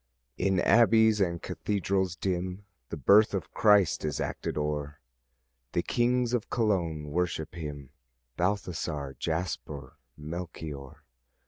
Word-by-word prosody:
In 95 Hz, -1 st, +1 dB
abbeys 110 Hz, -1 st, +5 dB
and 85 Hz, -3 st, 0 dB
cathedrals 95 Hz, -3 st, -1 dB
dim 90 Hz, +2 st, -3 dB, 0.2 s
The -, -, -5 dB
birth 105 Hz, +1 st, +5 dB
of 95 Hz, -, -4 dB
Christ 105 Hz, -5 st, +4 dB
is 75 Hz, -3 st, -2 dB
acted -, -, -3 dB
o'er; 75 Hz, -1 st, -2 dB, 0.7 s
The 85 Hz, -, +1 dB
kings 125 Hz, 0 st, +1 dB
of 120 Hz, -4 st, -1 dB
Cologne 85 Hz, -10 st, 0 dB
worship 80 Hz, -2 st, -1 dB
him, 75 Hz, -5 st, -7 dB, 0.4 s
Balthazar, 85 Hz, -7 st, -2 dB
Jasper, 80 Hz, -5 st, -4 dB, 0.2 s
Melchior. 75 Hz, -3 st, -7 dB
90 Hz, 110 wpm, -29 LUFS, 75-100 Hz, 0.7 s, abbeys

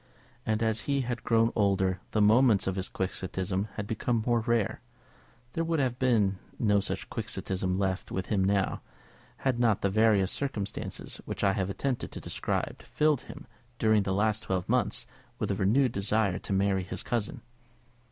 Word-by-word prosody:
And 110 Hz, +1 st, +1 dB
as 110 Hz, -1 st, +1 dB
he 140 Hz, -1 st, +2 dB
had 120 Hz, -1 st, -3 dB
grown 115 Hz, 0 st, +3 dB
older 95 Hz, -2 st, +2 dB
the 105 Hz, -, +2 dB
moments 110 Hz, 0 st, +5 dB
of 95 Hz, -, -1 dB
his 95 Hz, -1 st, -3 dB
Quixotism 95 Hz, +1 st, -2 dB
had 105 Hz, -, -3 dB
become 110 Hz, +2 st, -1 dB
more 120 Hz, -1 st, +3 dB
rare. 115 Hz, -2 st, 0 dB, 0.7 s
There 165 Hz, -, 0 dB
would 165 Hz, 0 st, 0 dB
have 130 Hz, -4 st, 0 dB
been 105 Hz, -7 st, +2 dB, 0.2 s
no 105 Hz, -3 st, +3 dB
such 100 Hz, -, -3 dB
Quixotism 95 Hz, -1 st, -2 dB
left 95 Hz, -1 st, -1 dB
with 95 Hz, -1 st, -2 dB
him 100 Hz, -3 st, +1 dB
now, 100 Hz, 0 st, +1 dB, 0.6 s
had 130 Hz, -3 st, +2 dB
not 115 Hz, -4 st, +2 dB
the 100 Hz, -, +2 dB
various 105 Hz, -2 st, +4 dB
circumstances 125 Hz, -8 st, -3 dB
which -, -, -4 dB
I 100 Hz, -1 st, +4 dB
have 95 Hz, -2 st, -1 dB
attempted 130 Hz, +5 st, -2 dB
to -, -, -5 dB
describe, -, -, -3 dB
filled 150 Hz, -3 st, +1 dB
him, -, -, -10 dB, 0.3 s
during 110 Hz, -2 st, +4 dB
the 95 Hz, -, -2 dB
last 105 Hz, +2 st, +1 dB
twelve 95 Hz, -2 st, -2 dB
months, -, -, +1 dB, 0.3 s
with -, -, -1 dB
a -, -, 0 dB
renewed 120 Hz, +6 st, +3 dB
desire 100 Hz, -2 st, +1 dB
to -, -, -8 dB
marry 95 Hz, 0 st, +2 dB
his 90 Hz, -, -4 dB
cousin. 115 Hz, -4 st, -2 dB
105 Hz, 170 wpm, -29 LUFS, 95-120 Hz, 0.7 s, moments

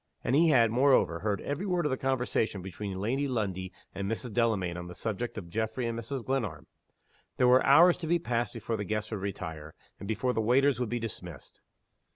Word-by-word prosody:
And 130 Hz, -, +1 dB
he 165 Hz, +2 st, +5 dB
had, 115 Hz, -6 st, +5 dB
moreover, 120 Hz, -, +3 dB
heard 105 Hz, 0 st, -1 dB
every 145 Hz, +8 st, -3 dB
word 180 Hz, -3 st, 0 dB
of 150 Hz, -, +1 dB
the -, -, +2 dB
conversation 125 Hz, -7 st, -1 dB
between 95 Hz, +1 st, -5 dB
Lady 130 Hz, +8 st, 0 dB
Lundie 95 Hz, -7 st, -2 dB, 0.2 s
and 100 Hz, +1 st, -3 dB
Mrs. 115 Hz, 0 st, -3 dB
Delamayn 105 Hz, -7 st, +1 dB
on 90 Hz, -1 st, -6 dB
the 90 Hz, -, -9 dB
subject 115 Hz, +4 st, -4 dB
of 95 Hz, -5 st, -6 dB
Geoffrey 110 Hz, +6 st, -2 dB
and 115 Hz, 0 st, -2 dB
Mrs. 115 Hz, +2 st, -5 dB
Glenarm. 130 Hz, -6 st, -2 dB, 0.7 s
There 125 Hz, -, +4 dB
were 125 Hz, +1 st, +6 dB
hours 175 Hz, +1 st, +6 dB
to 165 Hz, -, -5 dB
be 175 Hz, +2 st, +3 dB
passed 120 Hz, -7 st, -1 dB
before 115 Hz, -, -3 dB
the 105 Hz, -, -3 dB
guests 105 Hz, +2 st, -3 dB
would 105 Hz, -3 st, -3 dB
retire, 80 Hz, -6 st, -6 dB, 0.2 s
and 100 Hz, -, -7 dB
before 115 Hz, +4 st, 0 dB
the 110 Hz, -, 0 dB
waiters 130 Hz, +3 st, +3 dB
would 125 Hz, -3 st, -1 dB
be 120 Hz, -, -1 dB
dismissed. 90 Hz, -, -8 dB
115 Hz, 205 wpm, -29 LUFS, 100-130 Hz, 0.7 s, were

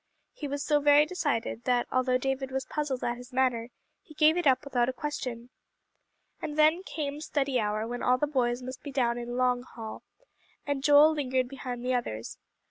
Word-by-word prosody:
He 295 Hz, -, -6 dB
was 285 Hz, 0 st, -3 dB
so 295 Hz, -1 st, +3 dB
very 290 Hz, +1 st, +6 dB
decided 285 Hz, -9 st, -2 dB
that 245 Hz, -1 st, +2 dB
although 255 Hz, 0 st, +2 dB
David 270 Hz, +1 st, -2 dB
was 265 Hz, 0 st, -3 dB
puzzled 290 Hz, -4 st, -3 dB
at 240 Hz, 0 st, -1 dB
his 245 Hz, +1 st, -12 dB
manner, 250 Hz, -2 st, +1 dB, 0.3 s
he 310 Hz, -, -17 dB
gave 310 Hz, +1 st, +5 dB
it 350 Hz, -4 st, +1 dB
up 260 Hz, -1 st, +4 dB
without 250 Hz, -4 st, +1 dB
a -, -, -2 dB
question. 255 Hz, -4 st, -5 dB, 0.9 s
And 300 Hz, 0 st, -4 dB
then 310 Hz, +3 st, +5 dB
came 295 Hz, -5 st, -4 dB
study 275 Hz, -4 st, 0 dB
hour 215 Hz, 0 st, -1 dB
when 240 Hz, +1 st, -5 dB
all 250 Hz, 0 st, +3 dB
the 295 Hz, -, +1 dB
boys 250 Hz, -4 st, 0 dB
must 255 Hz, +1 st, -7 dB
be 285 Hz, -, -7 dB
down 240 Hz, -3 st, +1 dB
in 240 Hz, +1 st, -5 dB
"Long 250 Hz, -1 st, +2 dB
Hall," 225 Hz, -3 st, -9 dB, 0.6 s
and 285 Hz, -2 st, -2 dB
Joel 295 Hz, +1 st, +7 dB
lingered 260 Hz, -4 st, 0 dB
behind 250 Hz, -2 st, -6 dB
the 255 Hz, -, +1 dB
others. 115 Hz, -, -3 dB
260 Hz, 195 wpm, -28 LUFS, 245-290 Hz, 0.9 s, Joel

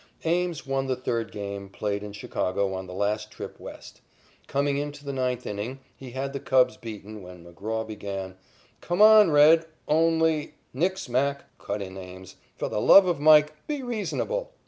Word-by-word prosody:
Ames 170 Hz, -1 st, 0 dB
won 135 Hz, 0 st, -1 dB
the 130 Hz, -, 0 dB
third 115 Hz, -3 st, -3 dB
game 100 Hz, -1 st, -6 dB
played 100 Hz, +1 st, -3 dB
in 105 Hz, 0 st, -7 dB
Chicago 100 Hz, -1 st, -2 dB
on 95 Hz, 0 st, -5 dB
the -, -, -9 dB
last 105 Hz, +2 st, -1 dB
trip -, -, -9 dB
West. -, -, -11 dB, 0.5 s
Coming 140 Hz, 0 st, 0 dB
into 145 Hz, 0 st, -5 dB
the 140 Hz, -, -4 dB
ninth 125 Hz, -2 st, -2 dB
inning, 105 Hz, +6 st, -5 dB, 0.2 s
he 130 Hz, -, -10 dB
had 135 Hz, +2 st, -4 dB
the 140 Hz, -, -3 dB
Cubs 130 Hz, -2 st, +3 dB
beaten, 110 Hz, -2 st, -9 dB
when 90 Hz, -2 st, -12 dB
McGraw 110 Hz, +6 st, -4 dB
began: 100 Hz, -3 st, -6 dB, 0.5 s
"Come 175 Hz, +2 st, -3 dB
on, 215 Hz, -3 st, +8 dB
'Red,' 160 Hz, +2 st, +6 dB, 0.2 s
only 160 Hz, -1 st, +2 dB
" -, -, -41 dB
"Nix, 180 Hz, +5 st, -1 dB
Mac," 140 Hz, +3 st, 0 dB, 0.2 s
cut 100 Hz, 0 st, -4 dB
in 95 Hz, 0 st, -9 dB
Ames, 95 Hz, 0 st, -11 dB, 0.2 s
"for -, -, -3 dB
the 105 Hz, -, -2 dB
love 195 Hz, -, +8 dB
of 175 Hz, -4 st, 0 dB
Mike, 150 Hz, 0 st, +6 dB
be 295 Hz, -3 st, -3 dB
reasonable." 475 Hz, -, -3 dB
130 Hz, 175 wpm, -26 LUFS, 100-155 Hz, 0.5 s, on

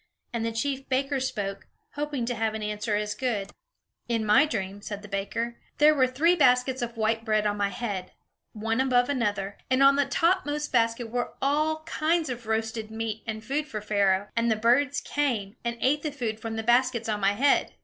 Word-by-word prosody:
And 230 Hz, -1 st, -1 dB
the 230 Hz, -, -1 dB
chief 270 Hz, +4 st, -3 dB
baker 270 Hz, +1 st, 0 dB
spoke, 205 Hz, -7 st, -3 dB, 0.3 s
hoping 290 Hz, -4 st, -2 dB
to 245 Hz, -, -1 dB
have 220 Hz, -1 st, -1 dB
an 220 Hz, -, -4 dB
answer 210 Hz, +1 st, -2 dB
as 210 Hz, 0 st, -1 dB
good: 220 Hz, -6 st, -2 dB, 0.6 s
"In 230 Hz, -2 st, 0 dB
my 260 Hz, +9 st, +5 dB
dream," 200 Hz, -6 st, -4 dB
said 205 Hz, 0 st, -6 dB
the -, -, -9 dB
baker, 220 Hz, +4 st, -3 dB, 0.2 s
"there 300 Hz, +1 st, +6 dB
were 260 Hz, -3 st, +3 dB
three 310 Hz, +8 st, +3 dB
baskets 255 Hz, -3 st, +3 dB
of 235 Hz, -1 st, -4 dB
white 225 Hz, +1 st, 0 dB
bread 215 Hz, -2 st, +1 dB
on 205 Hz, 0 st, +1 dB
my 200 Hz, -1 st, +1 dB
head, 200 Hz, -5 st, -4 dB, 0.4 s
one 225 Hz, +3 st, -1 dB
above 250 Hz, -1 st, +3 dB
another, 205 Hz, -7 st, -1 dB
and 260 Hz, +1 st, +4 dB
on 275 Hz, 0 st, +6 dB
the 285 Hz, -, +2 dB
topmost 310 Hz, -4 st, +1 dB
basket 230 Hz, -1 st, +1 dB
were 245 Hz, 0 st, -2 dB
all 310 Hz, +3 st, +1 dB
kinds 325 Hz, 0 st, 0 dB
of 240 Hz, -2 st, -7 dB
roasted 220 Hz, 0 st, -2 dB
meat 220 Hz, -1 st, -4 dB
and 220 Hz, -1 st, -4 dB
food 295 Hz, +3 st, -1 dB
for 220 Hz, -7 st, -4 dB
Pharaoh; 200 Hz, -1 st, +1 dB
and 230 Hz, 0 st, +2 dB
the 220 Hz, -, +3 dB
birds 250 Hz, +6 st, +2 dB
came, 235 Hz, -8 st, -1 dB
and 235 Hz, 0 st, -2 dB
ate 290 Hz, +3 st, +2 dB
the 305 Hz, -, -3 dB
food 230 Hz, -6 st, -3 dB
from 225 Hz, 0 st, -5 dB
the 225 Hz, -, -3 dB
baskets 240 Hz, 0 st, +2 dB
on 210 Hz, -1 st, -1 dB
my 200 Hz, 0 st, +3 dB
head." 275 Hz, +7 st, +2 dB
235 Hz, 200 wpm, -27 LUFS, 215-270 Hz, 0.6 s, there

